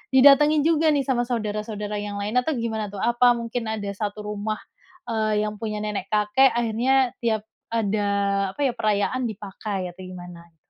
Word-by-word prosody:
didatengin 285 +2 +7
juga, 320 0 +3
nih, 280 - +1
sama 245 -2 0
saudara-saudara 210 -2 -3
yang 205 0 -5
lain 215 +5 -1
atau 300 +5 -1
gimana, 220 -2 -2
tuh? 195 - -5
Apa 240 +1 +4
mungkin 235 0 -4
ada 210 -2 -3
1 205 +1 -4
rumah, 210 +1 -3 0.5
eee, 215 -1 +1
yang 210 0 -5
punya 215 -2 -3
nenek-kakek 210 +5 +2
akhirnya 240 +3 +2
tiap 220 -3 0 0.3
ada 210 -2 0 0.5
apa, 290 - -5
ya, - - 0
perayaan 215 +4 0
dipakai 195 -3 -5
atau 185 - -14
gimana? 175 -2 -11
215 Hz, 155 wpm, -24 LUFS, 205-245 Hz, 0.5 s, didatengin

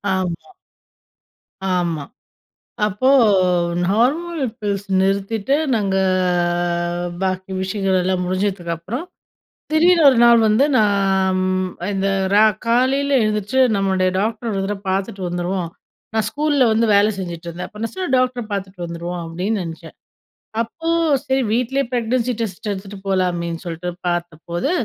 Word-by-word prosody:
ஆமா. 185 - -4 1.2
ஆமா. 175 -5 0 0.8
அப்போ 210 +5 -1 0.8
நார்மல் 285 - +1 0.2
பில்ஸ் 200 -1 -2
நிறுத்திட்டு. 200 +6 +1 0.2
நாங்க 200 -3 0 1.3
பாக்கி 185 0 -2
விஷயங்கள் 190 0 0
எல்லாம் 185 0 0
முடிஞ்சதுக்கப்புறம். 185 - -3 0.7
திடீர்னு 335 +1 +4
1 255 - +2
நாள் 235 -1 +7
வந்து 220 +7 +4
நான் 195 -3 +2
ம் 185 0 0 0.2
இந்த 195 0 0 0.3
ரா 210 +1 +6 0.2
காலையில 260 +4 +2
எழுந்திரிச்சு, 215 +4 0 0.2
"நம்முடைய 190 -2 +1
டாக்டர் 225 +3 -2
1 195 -2 -1
தடவ 205 0 -3
பார்த்துட்டு 195 0 -2
வந்துருவோம்." 175 0 -2 0.5
நான் 220 -1 +1
ஸ்கூல்ல 290 -2 +2
வந்து 225 +1 +3
வேலை 205 +2 +5
செஞ்சுட்டு 170 -2 -6
இருந்தேன். 170 +2 -6
அப்போ 210 - -13
நான் 230 - -4
சொன்னேன், 370 -7 -3
"டாக்டர 255 -1 0
பார்த்துட்டு 190 -3 -4
வந்துருவோம்." 170 +1 -5
அப்படின்னு 185 +5 -2
நினச்சேன். 165 0 -9 0.7
அப்போ, 325 +8 -7 0.4
சரி! 265 0 +1
வீட்டிலயே 260 +3 0
ப்ரெக்னன்சி 245 +1 0
டெஸ்ட் 215 -1 -4
எடுத்துட்டு 195 +1 -7
போகலாமேன்னு 175 -3 -1
சொல்லிட்டு 170 +1 -5 0.2
பார்த்தபோது, 175 - -3
195 Hz, 120 wpm, -20 LUFS, 185-235 Hz, 1.3 s, நாள்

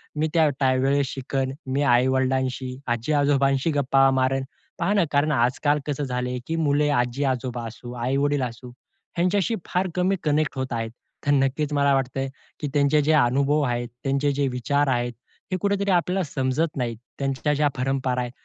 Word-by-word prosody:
मी 155 +1 +1
त्या 160 -3 +4
त्यावेळेस 135 +1 +2
शिकन. 135 0 -2 0.2
मी 135 +2 0
आई-वडिलांशी, 130 0 +1
आजी-आजोबांशी 140 +3 +2
गप्पा 135 -1 +3
मारेन. 130 0 +1 0.4
पहा 205 - +1
ना, 200 - +3
कारण 145 +1 +2
आज-काल 140 +3 +2
कसं 145 0 -2
झालंय, 125 -1 -2
की 165 - -1
मुले 150 -2 +2
आजी-आजोबा 125 -2 -1
असू, 120 +2 -9
आई-वडील 135 +4 0
असू, 120 +1 -6 0.5
ह्यांच्याशी 190 +5 +1
फार 185 +1 0
कमी 180 0 +1
मी 195 - +2
कनेक्ट 150 -1 +1
होत 130 -1 -3
आहेत. 115 -1 -3 0.3
तर 145 - +3
नक्कीच 140 +2 +1
मला 140 -1 +3
वाटतंय, 135 0 -1 0.3
की 150 - -2
त्यांचे 145 +1 +3
जे 155 - +2
अनुभव 140 +2 +3
आहेत, 120 -3 -1 0.2
त्यांचे 140 +1 +1
जे 140 0 0
विचार 140 +3 0
आहेत 120 -1 0 0.4
हे 185 - +1
कुठेतरी 200 0 +1
आपल्याला 180 +1 +1
समजत 145 +2 -1
नाहीत. 120 -3 -2 0.2
त्यांच्या 135 +2 0
ज्या 150 0 +2
परंपरा 130 -1 0
आहेत. 120 -1 -4
135 Hz, 165 wpm, -24 LUFS, 130-150 Hz, 0.5 s, त्या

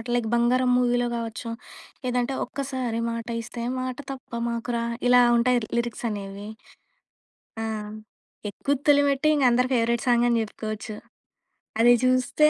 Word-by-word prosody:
Like 240 -2 0
'బంగారం' 250 +1 +3
మూవీలో 245 -1 +2
కావచ్చు. 230 0 -5 0.6
లేదంటే 250 +1 0
ఒక్కసారి 260 -4 -3
మాట 230 0 -5
ఇస్తే 235 +1 -7 0.2
మాట 255 -1 -3
తప్ప 260 -2 -10 0.2
మాకురా! 235 0 -2 0.3
ఇలా 250 0 +7 0.2
ఉంటాయి 245 +1 +3 0.2
లిరిక్స్ 235 0 -2
అనేవి. 200 0 -6 1.1
ఆ! - - -2 0.8
'ఎక్కు 275 +7 -4 0.2
తొలిమెట్టు' 285 0 +4
ఇంక 275 -3 +2
అందరి 250 +2 +2
ఫేవరైట్ 235 +2 +1
సాంగ్ 240 0 +4
అని 235 -1 +2
చెప్పుకోవచ్చు. 215 0 -6 0.9
అది 240 +1 +7
చూస్తే 255 +4 +3
240 Hz, 125 wpm, -25 LUFS, 230-255 Hz, 1.1 s, ఇలా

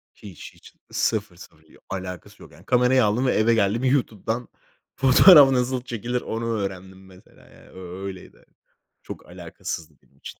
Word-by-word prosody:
Hiç, 95 -6 -12
hiç. - - -18 0.2
Sıfır, 100 -5 -2
sıfır. 85 -2 -16
Bir 80 - -22
alakası 90 -3 -8
yok, - - -16
yani. - - -19
Kamerayı 125 0 +3
aldım 110 +5 0
ve 130 - +2
eve 110 +2 +3
geldim. 110 +2 0
YouTube'dan 120 -3 -1 0.5
fotoğraf 135 +2 +7
nasıl 125 0 0
çekilir 120 0 -4
onu 115 +1 -5
öğrendim, 95 -1 -7
mesela, 95 0 -20
yani. - - -19
Ö 95 +1 -9
öyleydi. 95 -2 -10 0.6
Çok - - -10
alakasızdı 80 -2 -8
benim 70 - -31
için. - - -11
110 Hz, 155 wpm, -23 LUFS, 95-125 Hz, 0.6 s, fotoğraf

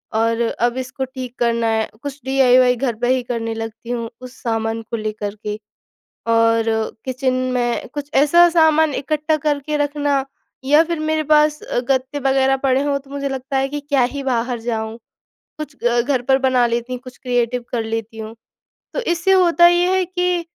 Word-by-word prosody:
और 230 +1 +1
अब 235 +1 0
इसको 260 +1 -4
ठीक 255 -1 -8
करना 235 -1 +1
है। 220 0 +1 0.2
कुछ 285 0 -6
डीआईवाय 255 -2 +4
घर 240 -1 -1
पर 245 - +1
ही 255 0 +2
करने 230 -2 -3
लगती 225 +1 -7
हूँ 235 -2 -3
उस 255 0 -10
सामान 225 -1 -1
को 230 +1 -5
लेकर 215 -1 -4
के 210 0 -2 0.8
और 230 0 +3 0.4
किचन 260 0 -1 0.2
में 240 -1 -1
कुछ 290 0 -5
ऐसा 340 +5 +6
सामान 315 -2 +4
इकट्ठा 305 +3 0
करके 300 0 -1
रखना। 290 -1 0 0.4
या 295 +4 +5
फिर 335 -1 -3
मेरे 310 0 0
पास 300 0 +3
अ, - - -3
गत्ते 260 +3 -1
वगैरह 270 0 +2
पड़े 265 0 +1
हों, 285 -1 0
तो 275 0 -19
मुझे 280 0 -3
लगता 270 0 -4
है 270 0 +1
कि 290 +1 -4
क्या 285 -3 +1
ही 280 - -3
बाहर 245 -2 -1
जाऊँ, 225 -1 -3 0.6
कुछ 305 -2 -7
अ, 240 0 +3
घर 255 0 0
पर 265 +2 +3
बना 260 -2 +3
लेती 235 +1 -2
हूँ, 250 - -4
कुछ 255 -1 -12
क्रिएटिव 245 -1 -1
कर 230 -2 -1
लेती 225 0 -4
हूँ। 220 +1 -7 0.6
तो - - -1
इससे 350 -3 +1
होता 345 -2 +5
ये 355 +1 +2
है 375 - +2
कि 360 -1 -1
260 Hz, 185 wpm, -19 LUFS, 235-290 Hz, 0.8 s, ऐसा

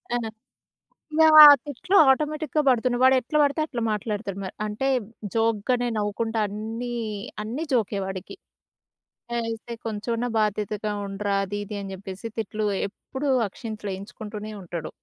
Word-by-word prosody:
ఆ! - - +2 1.0
యాహ్! 315 -1 +8 0.3
తిట్లు 290 +8 -1
ఆటోమేటిక్‌గా 305 +2 0
బడుతున్నయి. 245 -1 +2
వాడెట్ల 260 +2 +3
బడితే 285 +2 +1
అట్లా 245 -6 -4
మాట్లాడుతాడు 210 -2 -3
మ - - -4 0.2
అంటే, 215 +6 -2 0.5
జోక్‌గనే 230 +2 +1
నవ్వుకుంటా 220 +2 -1
అన్నీ, 225 +4 -5 0.5
అన్నీ 250 +9 -3
జో‌కే 215 -5 +1
వాడికి. 190 -1 -7 1.0
ఐతే 230 0 -3
కొంచెమన్నా 230 +3 -2
బాధ్యతగా 210 0 -1
ఉండరా, 200 0 -2
అదీది 205 +1 -5
అని 195 -1 -7
చెప్పేసి, 190 +2 -8
తిట్లు 215 0 -2 0.2
ఎప్పుడూ 265 +7 -6 0.2
అక్షంతలేయించుకుంటూనే 210 0 -7
ఉంటాడు. 170 -2 -5
220 Hz, 110 wpm, -25 LUFS, 205-245 Hz, 1.0 s, యాహ్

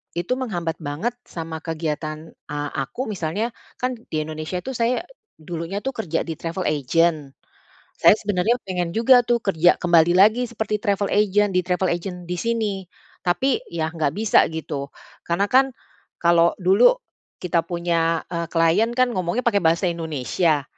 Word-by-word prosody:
itu 175 +8 -1
menghambat 175 -11 -3
banget 155 +12 -3
sama 165 -4 -6
kegiatan 155 -1 -4 0.2
a - - -3 0.3
aku 250 - -5
misalnya, 205 +3 -2 0.3
kan 255 0 -1 0.2
di 155 - -1
Indonesia 155 +3 -4
tuh 265 +8 -6
saya 240 +6 0 0.4
dulunya 170 +4 -5
tuh 265 +4 -4
kerja 170 -7 -2
di 165 - -3
travel 170 +4 -4
agent. 155 0 +1 0.7
Saya - - +8
sebenarnya 205 +3 +1
pengen 180 -2 -2
juga 240 +6 +5
tuh 240 0 +1
kerja 175 -6 +3
kembali 170 -1 +4
lagi 215 +5 +5
seperti 215 -2 -3
travel 200 -2 +1
agent 205 -1 +2
di 180 - +3
travel 180 +1 0
agent 180 0 -6
di 180 - -3
sini. 230 0 0 0.5
Tapi 235 +10 +1
ya 160 -2 -2
nggak 155 -3 0
bisa 220 -1 +4
gitu. 150 -3 -5 0.4
Karena 175 +4 +1
kan 270 +1 +4 0.5
kalau 170 0 +4
dulu 200 - +5 0.4
kita 175 -2 +1
punya, 170 -1 0
eee, 170 -1 -2
klien 165 +7 +3
kan 255 -1 +3
ngomongnya 185 +4 -1
pakai 205 -4 +3
bahasa 165 +2 +2
Indonesia. 160 -1 0
175 Hz, 155 wpm, -22 LUFS, 165-215 Hz, 0.7 s, Saya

